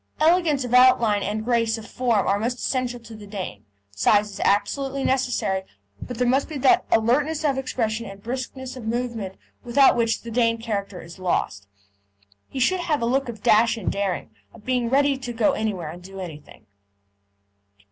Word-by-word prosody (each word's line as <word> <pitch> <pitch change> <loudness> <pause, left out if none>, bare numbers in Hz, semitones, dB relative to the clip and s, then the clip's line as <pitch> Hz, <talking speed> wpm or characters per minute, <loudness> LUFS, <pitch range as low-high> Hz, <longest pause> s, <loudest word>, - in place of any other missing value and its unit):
Elegance 315 -3 +3
of 245 - -5
outline 250 -5 +5
and 215 +2 -3
grace 230 -2 +1
of 220 - -9
form 235 -5 +1
are 200 +1 +1
most 240 +3 -1
essential 250 -1 -2
to 230 0 -12
a 210 -1 -11
Dane; 185 - -6 0.3
size 205 - +2
is 195 - -9
absolutely 270 +7 0
necessary; 245 -7 0 0.4
but 245 - -6
there 250 0 +1
must 270 +5 +2
be 310 - -5
that 265 0 +4
alertness 285 +8 +2
of 280 -2 +2
expression 230 -3 -2
and 195 0 -11
briskness 260 +1 -5
of 240 -4 -8
movement 230 -5 -3 0.3
without 265 +2 +5
which 230 -1 0
the 230 - -7
Dane 230 0 +2
character 205 -5 -4
is 170 +2 -12
lost. 100 - -1 0.8
He 265 - -5
should 370 +9 +2
have 305 -7 -1
a - - +2
look 265 +2 0
of 220 -3 -8
dash 230 +2 +4
and 215 - -2
daring, 195 - -2 0.2
of - - -16
being 250 -2 0
ready 275 +1 +2
to 245 -2 -5
go 225 -2 +3
anywhere 190 -8 -3
and 175 +2 -11
do 195 +1 -10
anything. 150 - -10
230 Hz, 180 wpm, -24 LUFS, 205-255 Hz, 0.8 s, outline